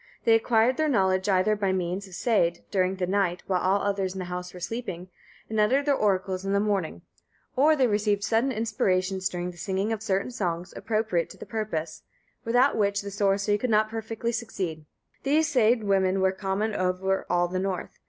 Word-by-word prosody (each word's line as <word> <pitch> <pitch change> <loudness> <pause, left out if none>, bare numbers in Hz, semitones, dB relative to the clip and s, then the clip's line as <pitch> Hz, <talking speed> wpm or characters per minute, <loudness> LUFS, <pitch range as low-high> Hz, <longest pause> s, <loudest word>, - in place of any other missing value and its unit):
They 225 - +5
acquired 225 +2 +3
their 310 -1 +1
knowledge 190 -5 +2
either 190 +2 +3
by 200 -2 0
means 185 +1 -2
of 185 - -10
seid, 175 -8 +1
during 185 -1 +1
the 185 -1 -1
night, 185 -2 0
while 185 -2 0
all 195 +2 +2
others 195 -2 -1
in - - -5
the 185 - -4
house 180 0 -5
were 180 - -10
sleeping, 185 -3 -5 0.4
and 220 -1 -2
uttered 260 +7 +3
their 290 - +3
oracles 190 -5 0
in 195 0 -1
the 200 - +3
morning; 195 - -1 0.5
or 300 +4 +5
they 270 -3 +3
received 205 -2 +1
sudden 230 +5 +1
inspirations 190 -4 0
during 180 0 -4
the 175 - -17
singing 195 +5 -1
of 215 - -4
certain 200 +2 -1
songs 180 -6 -3
appropriate 215 -6 -1
to - - -12
the - - -9
purpose, 170 -8 -4 0.4
without 245 +4 +3
which 200 -1 +1
the 200 - -6
sorcery 200 +1 +1
could 250 - -1
not 215 0 +3
perfectly 225 +1 -3
succeed. 185 -10 -4 0.3
These 300 +2 +2
seid 235 -4 +3
women 195 -1 +2
were 190 0 +3
common 195 +3 -2
over 190 0 -1
all 175 0 +2
the 185 +1 -2
North. 190 -1 -4
200 Hz, 195 wpm, -26 LUFS, 185-225 Hz, 0.5 s, They